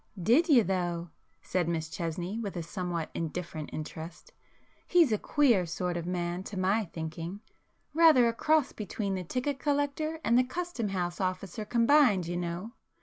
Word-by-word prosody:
"Did 245 - +3
you 255 -7 +7
though?" 175 -3 -2 0.3
said 175 -2 0
Miss 160 -1 -1
Chesney 175 +5 -4
with 200 -5 -4
a 170 - -3
somewhat 175 -2 -4
indifferent 165 -2 -4
interest,—"He's 175 - -2
a 215 - +1
queer 235 -12 +3
sort 175 +2 -2
of 170 0 -4
man 175 0 -2
to 205 - -6
my 195 +4 +2
thinking; 165 +3 -6 0.5
rather 310 -7 +6
a 230 - +1
cross 305 +3 +2
between 205 -1 -3
the 185 -1 -3
ticket 255 - -2
collector 290 +2 -1
and 250 +2 +3
custom 345 -8 -3
house 180 -2 -2
officer 185 +2 -3
combined, 235 - +4
you 175 +1 -3
know! 175 +5 -4
190 Hz, 150 wpm, -30 LUFS, 175-250 Hz, 0.5 s, you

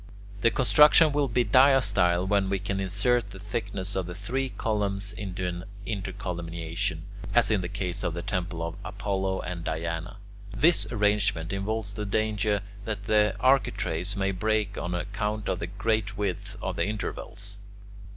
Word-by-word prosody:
The 115 - +5
construction 150 +5 +6
will 145 -1 +1
be 120 0 +1
diastyle 125 -10 +4
when 100 -1 +2
we 100 - +1
can 100 0 -3
insert 100 +4 +2
the 100 - -10
thickness 100 -1 -3
of 90 -1 -3
three 130 +7 -2
columns 105 -3 -1
in 95 -4 -6
an 90 -1 -3 0.2
intercolumniation, 90 -3 -3 0.3
as - - +5
in 105 -3 +2
the 85 - -4
case 90 -2 -3
of 85 - -1
the 85 - -4
temple 90 -3 -2
of 85 +2 -4
Apollo 95 -1 -2
and 85 -2 -5
Diana. 85 +4 -3 0.4
This 155 -10 +4
arrangement 105 -6 +1
involves 100 +1 -2
the 105 -1 -4
danger 105 -1 +1 0.2
that 105 -2 -4
the 105 -2 +3
architraves 100 -8 +1
may 100 0 +1
break 105 +1 0
on 90 0 -3
account 105 +3 -3
of 90 - -1
the 85 - -3
great 105 +2 -1
width 100 -4 -3
of - - -3
the - - +1
intervals. 105 -1 -4
100 Hz, 155 wpm, -27 LUFS, 90-110 Hz, 0.4 s, construction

